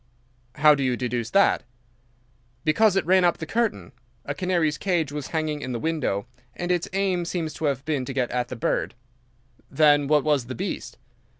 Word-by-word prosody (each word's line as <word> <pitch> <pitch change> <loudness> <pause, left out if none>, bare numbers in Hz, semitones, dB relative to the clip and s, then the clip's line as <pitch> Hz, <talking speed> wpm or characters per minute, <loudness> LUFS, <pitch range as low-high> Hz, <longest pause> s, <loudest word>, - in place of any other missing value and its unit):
"How 150 0 +6
do 145 - -1
you 130 -2 0
deduce 120 -2 -2
that?" 200 +6 +3 1.0
"Because 195 +6 +3
it 195 - +1
ran 185 +2 +4
up 175 -1 +3
the 160 - -5
curtain. 225 - -1 0.3
A 145 - -3
canary's 165 -2 0
cage 170 -7 0
was 145 -2 -5
hanging 155 -2 -2
in 130 - -4
the 120 - -3
window, 140 -10 -1 0.3
and 175 0 -2
its 175 -1 0
aim 190 -2 0
seems 170 -2 -3
to 160 - -4
have 140 -2 -1
been 150 -5 -1
to 135 - -5
get 125 -3 -1
at 125 0 -1
the 125 - -6
bird." 115 - -1 0.7
"Then 145 -2 +4
what 150 -1 +3
was 145 -6 +1
the 130 - -5
beast?" - - -5
150 Hz, 190 wpm, -24 LUFS, 135-175 Hz, 1.0 s, How